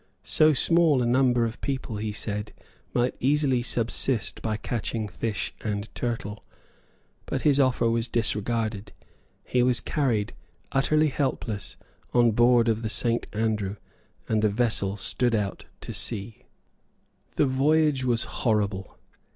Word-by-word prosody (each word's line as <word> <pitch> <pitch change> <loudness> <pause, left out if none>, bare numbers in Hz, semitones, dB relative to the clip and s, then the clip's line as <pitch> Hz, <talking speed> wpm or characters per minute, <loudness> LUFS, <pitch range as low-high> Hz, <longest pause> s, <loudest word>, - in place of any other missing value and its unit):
So 155 0 +4
small 155 -2 +3
a - - 0
number 125 -1 +3
of 115 +1 -5
people, 130 -5 -3
he 105 +1 -3
said, 105 0 -4 0.4
might 125 +1 +1
easily 135 -2 +2
subsist 120 -1 0
by 110 -2 -1
catching 110 0 -3
fish 105 +2 -3
and 105 -1 -3
turtles. 115 -3 -3 0.9
But - - -2
his 145 -2 +4
offer 130 -3 +3
was 115 0 +1
disregarded; 110 -2 -1 0.5
he 125 - +1
was 125 -1 +3
carried, 120 -8 0 0.4
utterly 155 +3 +3
helpless, 130 -7 -3 0.4
on 120 -1 +5
board 120 +1 +4
of 110 -1 +1
the 110 - -2
Saint 115 +2 0
Andrew; 105 -2 -1 0.5
and 110 -1 +1
the 110 - +3
vessel 105 -3 0
stood 120 +3 0
out 100 -3 -2 0.2
to - - -6
sea. 110 -1 -4 0.9
The 150 - +3
voyage 140 +1 +2
was 120 -2 +1
horrible. 105 -4 -1
115 Hz, 135 wpm, -26 LUFS, 110-130 Hz, 0.9 s, on